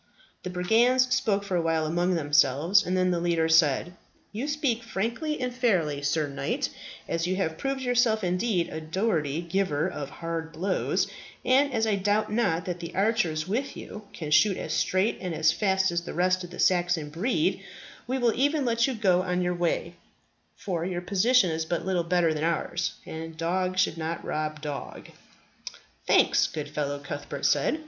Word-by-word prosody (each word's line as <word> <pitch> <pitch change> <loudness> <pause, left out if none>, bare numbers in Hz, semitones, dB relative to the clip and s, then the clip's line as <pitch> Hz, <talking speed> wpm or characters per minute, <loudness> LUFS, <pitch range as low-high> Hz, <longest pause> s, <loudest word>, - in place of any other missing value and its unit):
The 180 - -5
brigands 240 +8 +3
spoke 220 -7 +1
for 195 -2 -3
awhile 165 -2 +1
among 175 +3 +1
themselves, 150 +5 +3
and 185 0 -1
then 185 0 +2
the 175 - 0
leader 170 -1 +1
said, 160 +1 +3 0.4
"You 230 +7 -4
speak 290 -6 0
frankly 235 +8 -3
and 250 -1 -2
fairly, 180 - +1
Sir 150 +2 +1
Knight, 140 -1 -2 0.4
and - - -4
as 165 +1 0
you 185 - 0
have 160 -4 -1
proved 270 0 -2
yourself 245 -4 +2
indeed 180 0 0
a 160 - -6
doughty 160 -3 -1
giver 170 -3 0
of 145 -6 -5
hard 165 0 -5
blows, 185 +4 0 0.4
and 275 +3 +4
as 225 -3 +1
I 210 -2 +1
doubt 205 +2 0
not 190 -7 +1
that 180 -1 -4
the 170 -1 -7
archers 190 -7 +1
with 245 +8 -2
you 210 -1 -9
can 155 -3 -6
shoot 190 +5 +4
as 160 - -4
straight 185 +7 +1
and 180 -3 -3
as 155 - +4
fast 190 -2 +1
as 170 0 0
the 170 - -8
rest 185 +1 +2
of 175 - -8
the 180 - -10
Saxon 175 -4 +1
breed, 240 - 0 0.4
we 260 +2 -1
will 240 -3 +2
e'en 285 +2 +1
let 235 0 +2
you 265 - -2
go 185 -5 +3
on 180 -1 -1
your 180 0 0
way, 175 0 -1 0.6
for 175 -4 -3
your 175 0 -3
position 200 +2 +3
is 160 0 -1
but 170 +1 -3
little 185 -2 +1
better 170 -1 +2
than 155 0 -3
ours, 170 +1 -1
and 160 0 -7
dog 185 +3 -1
should 180 -3 +1
not 165 +1 -4
rob 155 0 -3
dog." 145 -2 -6 1.0
"Thanks, - - +4
good 150 -2 -6
fellow," 145 -1 -2
Cuthbert 140 0 -6
said. 315 - +2
180 Hz, 185 wpm, -27 LUFS, 165-215 Hz, 1.0 s, and